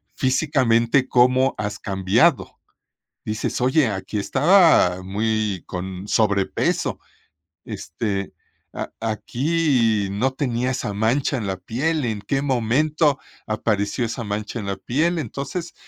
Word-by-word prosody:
físicamente 130 -2 +2
cómo 130 +2 +4
has 105 -1 -4
cambiado, 95 -1 +1 0.7
dices: 110 +3 -3
"Oye, 130 +2 +3
aquí 100 0 -3
estaba, 150 - +4
muy 105 -1 -1
con 95 +2 -6
sobrepeso, 100 -3 +1 0.7
este, 100 +2 -4 0.4
a - - -5
aquí 115 -2 0
no 125 +7 0
tenía 125 -2 -1
esa 105 -5 -3
mancha 120 +7 +1
en 105 -5 -3
la 95 - -1
piel, 135 - -2
¿en 110 -4 -2
qué 135 +5 -1
momento 145 +4 +1 0.3
apareció 110 +1 -1
esa 115 +1 -3
mancha 105 +3 -4
en 105 - -6
la 100 - -2
piel?", 165 - 0
entonces, 140 - -5
115 Hz, 115 wpm, -22 LUFS, 105-135 Hz, 0.7 s, cómo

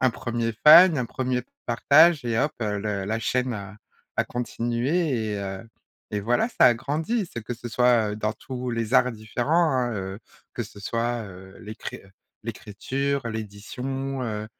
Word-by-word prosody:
un 130 - +4
1er 115 -1 -2
fan, 170 +1 +9
un 125 -2 -1
1er 125 -1 -2 0.2
partage 145 +5 +5
et 115 -2 0
hop 150 +4 +1
heu, 105 -1 -1
le 100 -2 -2
la 110 +3 -1
chaîne 125 +2 0
a 100 -1 -7 0.4
a - - +2
continué 120 +1 -1
et, - - -2
heu, 100 +3 -6 0.4
et 105 - -1
voilà, 120 - +1
ça 230 - +4
a 120 - +6
grandi. 160 - -2
C'est 120 - -6
que 115 - -5
ce 120 0 -7
soit, 120 -3 +3
heu, - - -5
dans 110 0 -1
tous 125 +1 -6
les 115 +1 -2
arts 125 0 +5
différents, 125 +10 0
hein, 125 -2 0
heu, 95 -1 -5 0.4
que - - -2
ce - - -11
soit, 115 +3 -2
heu, 95 -1 -12
l'écri 110 +1 -7
heu, 95 - -17 0.3
l'écriture, 130 +5 -3
l'édition, 125 +6 -5
heu, 110 -3 -3
120 Hz, 175 wpm, -25 LUFS, 110-130 Hz, 0.4 s, fan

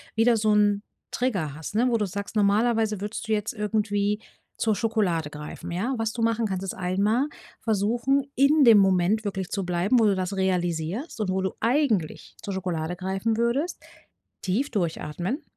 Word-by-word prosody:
wieder 225 +1 +4
so 215 0 +2
'n 205 -1 +3 0.3
Trigger 195 - -1
hast, 160 +6 -7
ne? 245 +3 +3
Wo 235 - +2
du 210 - 0
sagst, 200 +3 -6
normalerweise 215 0 +2
würdest 210 +2 -5
du 220 - +1
jetzt 210 0 -1
irgendwie 210 -1 0 0.4
zur 220 -2 +1
Schokolade 200 -9 0
greifen, 150 +3 -8
ja? 200 +10 -1
Was 225 -1 -1
du 235 - -4
machen 230 0 +1
kannst 190 -2 -2
ist 195 - -3
einmal 200 +9 +1 0.3
versuchen 235 +6 +1
in 285 +3 +5
dem 230 -4 +8
Moment 195 +2 +3
wirklich 190 -2 -3
zu 195 -3 -2
bleiben, 180 +7 +2
wo 225 - +4
du 200 -2 +3
das 185 +1 -3
realisierst 180 - -1
und 210 -3 -1
wo 190 0 0
du 190 0 -1
eigentlich 230 - 0
zur 200 - -5
Schokolade 180 -3 -3
greifen 190 +5 -1
würdest, 245 +9 -1 0.6
tief 225 +10 -1
durchatmen. 175 - -2
205 Hz, 175 wpm, -25 LUFS, 185-230 Hz, 0.6 s, dem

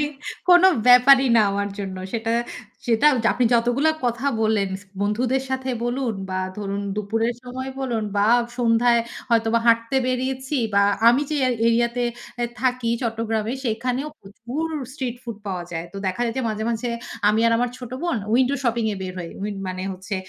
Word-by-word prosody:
মানে, 295 - +2 0.4
কোনো 360 +1 +8 0.2
ব্যাপারই 260 +2 +7
না - - +6
আমার 200 0 -1
জন্য। 190 -2 -5 0.2
সেটা, 225 -1 -2 0.6
সেটা 235 +4 +3 0.3
আপনি 250 - +1
যতগুলা 245 +6 +3
কথা 240 +2 -1
বললেন, 215 -3 +2 0.3
বন্ধুদের 245 +6 0
সাথে 260 0 -2
বলুন 240 -1 -1 0.2
বা 185 - -1 0.2
ধরুন 200 -1 -3
দুপুরের 225 +3 -1
সময় 260 +1 -5
বলুন 235 -5 -1
বা 200 +1 +3 0.3
সন্ধ্যায় 235 0 +3 0.3
হয়তোবা 230 0 +3
হাঁটতে 230 +2 +3
বেরিয়েছি 260 +2 -2 0.2
বা 200 - +5 0.3
আমি 245 +4 +4
যে 305 - 0 0.3
এরিয়াতে 235 +1 +1 0.3
অ্যা 240 -1 -1
থাকি, 250 -2 0
চট্টগ্রামে, 225 -1 -1
সেখানেও 250 +5 -1
প্রচুর 235 +10 -5 0.3
স্ট্রিট 255 -3 -4
ফুড 235 -4 -6
পাওয়া 185 -3 -3
যায়। 165 0 -4
তো - - -9
দেখা 190 +5 -2
যায় 230 -1 -2
যে, - - 0
মাঝে, 215 0 -3
মাঝে 235 +1 -2 0.4
আমি 215 +1 +3
আর 230 - +3
আমার 245 0 0
ছোট 245 -2 -8
বোন 345 -7 0 0.2
উইন্ডো 260 +3 +3
শপিং 235 -1 +1
এ - - -8
বের 185 -1 -5
হয়। 170 -2 -6
উইন্ড 205 -1 -4
মানে 185 0 -4
হচ্ছে 190 +2 -6
235 Hz, 170 wpm, -23 LUFS, 215-255 Hz, 0.6 s, কোনো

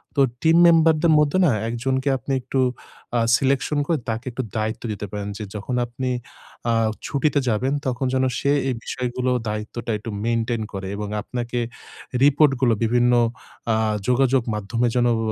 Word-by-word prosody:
তো 140 - +3 0.2
টিম 160 +3 +4
মেম্বারদের 165 -1 +4
মধ্যে 150 +4 +2
না 150 - +4 0.2
১ 125 +3 -2
কে 140 - +1
আপনি 125 +3 -6
একটু 135 +2 -2 0.6
আ - - +3 0.2
selection 135 +2 0
করে 165 - +2
তাকে 115 +2 -3
একটু 130 +2 -3
দায়িত্ব 110 +2 -2
দিতে 105 0 -4
পারেন। 105 -1 -4
যে 105 - -5
যখন 105 +5 -3
আপনি 125 +2 -4 0.6
আ - - +2 0.3
ছুটিতে 145 0 +1
যাবেন 130 +6 0
তখন 130 +1 -1
যেন 130 0 +2 0.2
সে 140 - +1 0.2
এই 125 - -1
বিষয়গুলো 125 0 -2 0.2
দায়িত্বটা 110 +2 -4
একটু 110 +2 -8 0.2
maintain 115 0 0
করে। 95 -1 -5
এবং 105 0 -4
আপনাকে 120 +1 -4 0.6
রিপোর্টগুলো 135 -4 +4
বিভিন্ন 120 +2 +3 0.6
আ - - +2 0.3
যোগাযোগ 130 0 +3
মাধ্যমে 115 +4 -1
যেন 120 -1 +3
ও - - -1
125 Hz, 160 wpm, -22 LUFS, 115-135 Hz, 0.6 s, টিম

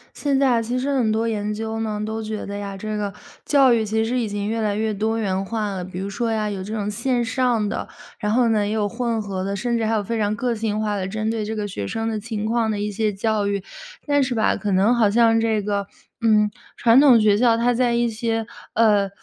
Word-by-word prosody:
现 280 -2 0
在 275 -1 +3
啊， 235 -2 +3
其 240 +3 -2
实 270 +3 -2
很 235 -5 +2
多 225 +1 0
研 210 -2 -2
究 220 +1 -4
呢， 215 -2 -2
都 220 +1 -4
觉 215 -1 -4
得 200 - -6
呀， 200 -1 -5
这 215 +2 -4
个 205 -1 -3 0.3
教 270 -4 +5
育 225 -2 +1
其 220 +1 0
实 245 +3 -1
已 230 - -1
经 205 0 -3
越 225 +1 -1
来 210 -2 0
越 220 0 -1
多 220 +2 -1
元 190 -3 -1
化 215 0 -2
了。 190 -2 -4
比 180 0 -7
如 195 +1 -3
说 230 +3 -2
呀， 215 -1 -1
有 195 -2 -4
这 210 +3 -6
种 210 -2 -2
线 240 +3 0
上 235 -2 +1
的， - - -3 0.3
然 210 -2 -1
后 240 +1 +3
呢， 215 -2 +2
也 205 - -2
有 215 -2 0
混 230 0 -2
合 195 -3 -4
的， 200 +1 -2
甚 235 +4 -1
至 225 - 0
还 220 - 0
有 215 -2 +1
非 230 +3 -3
常 210 0 0
个 240 +1 -1
性 215 -1 -2
化 210 -1 -1
的， 190 -2 -2
针 215 +2 -2
对 225 -1 -2
这 220 +1 -4
个 210 -1 -2
学 105 - -5
生 225 - -3
的 220 -1 -2
情 215 -1 -4
况 225 0 +1
的 210 - -2
一 210 +1 -2
些 215 +1 0
教 210 +1 0
育。 200 -1 -1 0.4
但 285 -1 +3
是 255 -1 -1
吧， 220 - +2
可 205 - -3
能 195 +5 +4
好 225 -3 +3
像 225 +1 +4
这 225 -2 +1
个， 200 -1 -2 0.3
嗯， 215 -2 +4 0.3
传 235 +1 +5
统 270 -5 +7
学 210 -1 +4
校 235 0 +4
它 240 +1 +2
在 240 0 +1
一 235 0 +2
些， 225 0 -2 0.3
呃， 210 -3 +3
220 Hz, 280 characters per minute, -22 LUFS, 205-230 Hz, 0.4 s, 统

